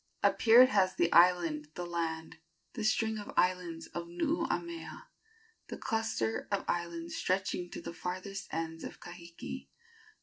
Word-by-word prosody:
Appeared 245 +3 +7
has 190 -5 +3
the 170 -1 +2
island, 170 -4 +5
the 175 - -4
land, 165 -1 -3 0.4
The 225 - -4
string 220 0 +1
of 205 - -7
islands 180 -2 +1
of 170 0 -4
Nuuamea, 335 - -2 0.6
The - - -6
cluster 220 - -1
of 200 - 0
islands 170 -1 -2
stretching 185 -1 -1
to - - -7
the - - -6
farthest 185 +3 -5
ends 165 0 -3
of - - -7
Kahiki. 170 -1 -8
180 Hz, 135 wpm, -32 LUFS, 170-210 Hz, 0.6 s, Appeared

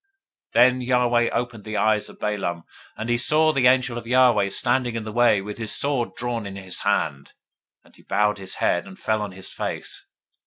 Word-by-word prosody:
022:031 395 - -49 0.6
Then 130 0 +3
Yahweh 120 -1 +2
opened 120 -3 -3
the 110 0 -4
eyes 110 -1 +1
of - - -15
Balaam, 90 -5 -2 0.3
and 110 - -4
he 120 0 +1
saw 155 +5 +4
the 135 -3 +3
angel 125 -2 +2
of 115 - -12
Yahweh 120 -5 +4
standing 120 +3 0
in 115 - -3
the 110 - -6
way, 115 -3 +3
with 105 +2 -7
his 110 -2 0
sword 125 -9 -1
drawn 120 -3 -3
in 100 - -8
his 95 -2 -5
hand; 70 0 -1 0.5
and - - -23
he - - -19
bowed 105 -1 0
his 95 0 -8
head, 85 - 0
and 190 - -12
fell 110 - -1
on 105 -2 -4
his 95 +1 -11
face. - - -6
115 Hz, 205 wpm, -23 LUFS, 105-125 Hz, 0.6 s, saw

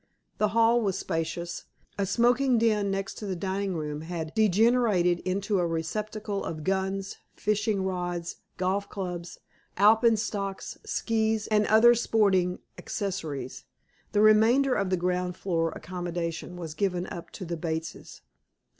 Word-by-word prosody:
The 210 - +4
hall 230 +3 +3
was 195 -4 0
spacious; 165 -1 -3 0.3
a 200 -1 -1
smoking 245 +4 +3
den 215 -3 +2
next 195 0 -3
the 200 -3 -3
dining 190 +1 -2
room 150 -1 -4
had 160 -1 -5
degenerated 215 -4 +3
into 195 +2 -1
a 175 - +1
receptacle 205 +5 -3
of 155 -2 -5
guns, 190 +2 -1 0.2
fishing 210 -1 0
rods, 175 -2 -3 0.2
golf 190 +2 -1
clubs, 180 -3 -5 0.4
Alpenstocks, 210 -2 +2
skis 220 -1 0
and 210 -1 +2
other 225 +2 +7
such 235 - -1
sporting 190 -6 +2 0.2
accessories. 160 - -4 0.5
The 205 - +2
remainder 225 +6 +5
of 195 -4 0
the 185 - +1
ground 180 0 -1
floor 165 -3 0
accommodation 175 0 -4
was 165 -3 -6
given 180 0 -1
up 170 -3 -8
to 190 - -7
the 170 0 -3
Bateses. 160 0 -5
195 Hz, 135 wpm, -27 LUFS, 175-215 Hz, 0.5 s, other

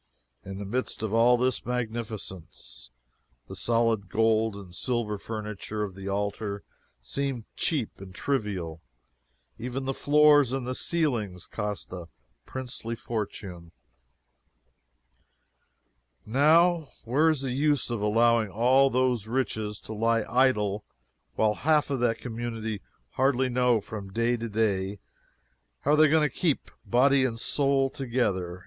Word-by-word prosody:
In 95 0 -7
the 100 - -5
midst 120 +2 -2
of 110 -1 -2
all 120 +2 +5
this 125 +1 0
magnificence, 110 - -5 0.6
the - - -8
solid 115 -4 +1
gold 110 -1 +2
and 95 -3 -10
silver 110 0 -1
furniture 105 -1 -5
of 100 -3 -5
the 95 +1 -8
altar 100 +1 -2 0.4
seemed 135 - -3
cheap 135 - -1
and 95 -1 -9
trivial. 95 - -3 0.8
Even 125 +3 -4
the 135 - -1
floors 145 -2 +5
and 135 -2 -2
ceilings 120 - -1
cost 105 -3 -5
a 90 -2 -7 0.4
princely 125 -3 -4
fortune. 100 -7 -6 2.5
Now, 160 +6 +4 0.2
where 145 +8 +3
is 155 -4 +1
the 135 -2 -2
use 145 -1 +1
of 115 -3 -2
allowing 115 +1 +3
all 125 +7 +4
those 125 -4 +1
riches 110 -4 -2
to 110 - -7
lie 115 +1 +1
idle, 105 -5 +2 0.5
while 110 -1 +3
half 150 +4 +1
of 135 - 0
that 120 -1 +1
community 115 -3 -4 0.3
hardly 130 -1 +2
know, 125 -2 +3
from 100 -1 -8
day 115 +3 +1
to 115 0 -5
day, 100 -2 0 0.8
how 145 +2 +3
they 155 0 +6
are - - -1
going 155 -1 +4
to 135 - -12
keep 160 -6 0 0.2
body 135 +2 +4
and 120 -3 -1
soul 135 +1 +2
together? 100 -9 -1
115 Hz, 130 wpm, -27 LUFS, 105-130 Hz, 2.5 s, they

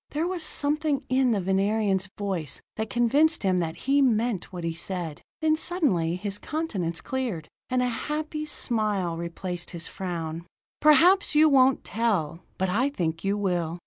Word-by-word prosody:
There 305 +3 -1
was 360 -1 -3
something 300 -1 0
in 260 0 +3
the 220 -4 +2
Venerian's 195 +1 +1
voice 185 -8 -2 0.2
that 220 0 -3
convinced 280 +8 +3
him 185 -2 +2
that 160 -2 -2
he 280 +2 +4
meant 230 -6 +1
what 180 -2 -6
he 165 -1 -1
said. 170 -2 -5 0.2
Then 310 0 +3
suddenly 275 - 0
his 200 +2 -3
countenance 195 - -3
cleared, 240 -12 -3 0.2
and 255 -1 +1
a - - +1 0.2
happy 305 0 -3
smile 210 - -1
replaced 170 +1 -5
his 170 -1 -6
frown. 170 -3 -5 0.3
"Perhaps 335 +4 +5
you 310 +1 +7
won't 265 -1 +4
tell, 195 -9 0 0.2
but 190 - 0
I 235 +9 +1
think 165 - -2
you 200 +1 +1
will. 175 -4 -1
210 Hz, 160 wpm, -26 LUFS, 175-280 Hz, 0.3 s, you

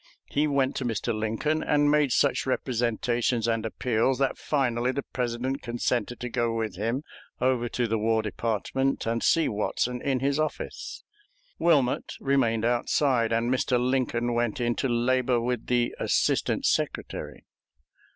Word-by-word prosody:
He 150 +2 +2
went 140 -2 +1
to - - -2
Mr. 115 0 -1
Lincoln 110 +9 -1
and 145 -1 +3
made 150 -3 +3
such - - +2
representations 120 -2 0
and 115 -1 0
appeals 120 +3 0
that 135 -1 +1
finally 125 -4 0
the 140 +1 -3
President 125 +3 -3
consented 120 0 -2
to 125 - -2
go 120 -1 -1
with 110 -4 -2
him 115 +8 -2 0.4
over 125 -2 +1
to 120 0 -1
the 110 0 0
War 110 0 +1
Department 115 +5 -1
and 115 0 -1
see 165 -1 +3
Watson 120 +3 -1
in 135 -2 0
his 140 +3 0
office. 155 - -4 0.6
Wilmot 145 -7 +2
remained 120 -5 +1
outside, 120 0 +2
and 115 +2 +1
Mr. 130 -1 +1
Lincoln 125 -1 0
went 120 0 0
in 120 -1 +1
to 135 - 0
labor 125 +1 +2
with 120 0 -2
the 120 -1 +1
Assistant - - +1
Secretary. - - -2
120 Hz, 150 wpm, -27 LUFS, 115-135 Hz, 0.6 s, and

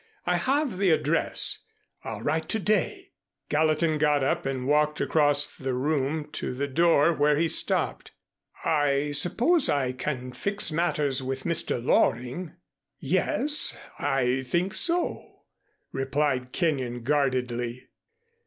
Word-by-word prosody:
I - - +1
have 270 -7 0
the 195 -2 +3
address. 160 - +1 0.4
I'll - - -6
write 160 +2 -1
to - - 0
day." 210 -4 -1 0.4
Gallatin 155 +1 +1
got 150 -2 +2
up 135 - -1
and 130 -2 -3
walked 150 +1 +2
across 145 -2 +3
the 130 -1 -3
room 145 +2 -1
to - - -4
the 140 +2 -2
door, 165 +2 +3
where 150 -1 +2
he 165 +2 +2
stopped. - - 0 0.6
"I 145 -2 +1
suppose 230 - +3
I 135 -3 +1
can 130 -1 -4
fix 200 +9 -1
matters 150 -5 0
with 130 0 -4
Mr. 170 -6 0
Loring 125 +11 0 0.3
" - - -64 0.2
"Yes, 300 +1 +1 0.2
I 130 -1 0
think 175 +9 -1
so," 345 0 0 0.5
replied 135 -1 -1
Kenyon 130 -8 -2
guardedly. 125 -2 -1
145 Hz, 125 wpm, -26 LUFS, 130-165 Hz, 0.6 s, the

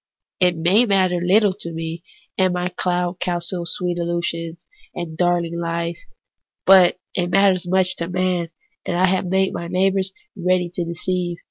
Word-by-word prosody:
It 180 -2 +3
may 190 +9 +3
matter 185 -3 +2
little 195 +3 +3
to 170 - -3
me, 165 0 -5 0.3
in 185 -1 +2
my 180 0 -1
cloud 180 0 -1
castle 175 0 -1
of 170 - -3
sweet 175 -1 -1
illusions 170 -1 -2 0.4
and 170 -2 -5
darling 170 0 0
lies; 170 - -3 0.6
but 185 -2 +6 0.2
it 175 -1 0
matters 190 -1 +3
much 185 0 +1
to 170 - -3
Man 180 -2 -1 0.4
that 175 - -1
I 180 +1 +4
have 185 0 0
made 190 +1 +1
my 170 - -5
neighbours 190 +1 +1 0.2
ready 180 -2 0
to 175 -1 -2
deceive. 175 +1 -3
180 Hz, 160 wpm, -21 LUFS, 170-185 Hz, 0.6 s, but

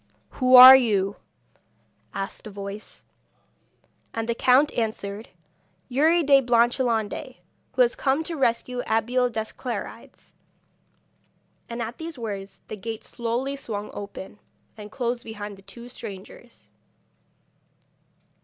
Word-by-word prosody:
'Who 255 -1 +3
are 255 +1 +13
you?' 205 -6 +1 0.9
asked 195 +2 -6
a - - -7
voice. 200 +1 -8 1.1
And 225 0 -3
the 235 - +1
count 260 +5 +3
answered: 215 -2 -4 0.6
'Youri 315 +7 +3
de 275 -2 +5
Blanchelande, 235 -2 0 0.4
who 255 - +5
has 240 - +1
come 275 +3 0
to 330 +1 -5
rescue 250 -2 0
Abeille 245 +3 +1
des 220 -1 -5
Clarides.' 250 -2 -7 1.4
And 235 0 -4
at 230 +2 -7
these 325 -2 -7
words 200 -4 -7
the - - -6
gate 225 +2 -6
slowly 240 +4 -3
swung 210 -6 -6
open, 200 0 -9 0.4
and 210 -1 -10
closed 245 -1 -3
behind 210 -2 -7
the 195 - -17
two 235 +4 -12
strangers. 220 0 -11
235 Hz, 115 wpm, -24 LUFS, 210-255 Hz, 1.4 s, are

